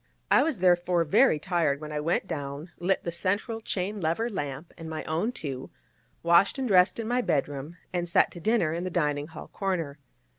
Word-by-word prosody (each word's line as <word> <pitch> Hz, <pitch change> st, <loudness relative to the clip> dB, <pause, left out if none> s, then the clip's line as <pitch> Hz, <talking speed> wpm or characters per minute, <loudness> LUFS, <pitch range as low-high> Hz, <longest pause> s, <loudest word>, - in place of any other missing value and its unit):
I -, -, +7 dB
was 315 Hz, -6 st, 0 dB
therefore 175 Hz, -1 st, +3 dB
very 150 Hz, 0 st, +4 dB
tired 155 Hz, -4 st, 0 dB
when 150 Hz, 0 st, -7 dB
I 150 Hz, -, -2 dB
went 165 Hz, +5 st, 0 dB
down, 145 Hz, -1 st, -5 dB
lit 185 Hz, +2 st, +1 dB
the 170 Hz, -, -2 dB
central 205 Hz, +6 st, -1 dB
chain 200 Hz, 0 st, -2 dB
lever 175 Hz, +9 st, 0 dB
lamp 145 Hz, -3 st, -5 dB
and 165 Hz, -1 st, -8 dB
my 155 Hz, -1 st, -4 dB
own 170 Hz, +9 st, -1 dB
two, 140 Hz, -, -6 dB, 0.5 s
washed 170 Hz, +8 st, +4 dB
and 265 Hz, -1 st, -1 dB
dressed 185 Hz, -3 st, +5 dB
in 225 Hz, -, -3 dB
my 245 Hz, +2 st, +2 dB
bedroom, 145 Hz, -, -2 dB, 0.2 s
and 175 Hz, -1 st, -1 dB
sat -, -, +4 dB
to 175 Hz, -, -9 dB
dinner 195 Hz, -4 st, +2 dB
in 170 Hz, +1 st, -3 dB
the 185 Hz, -, -2 dB
dining 150 Hz, -4 st, 0 dB
hall 160 Hz, -1 st, -10 dB
corner. 165 Hz, -7 st, -2 dB
170 Hz, 195 wpm, -27 LUFS, 155-190 Hz, 0.5 s, I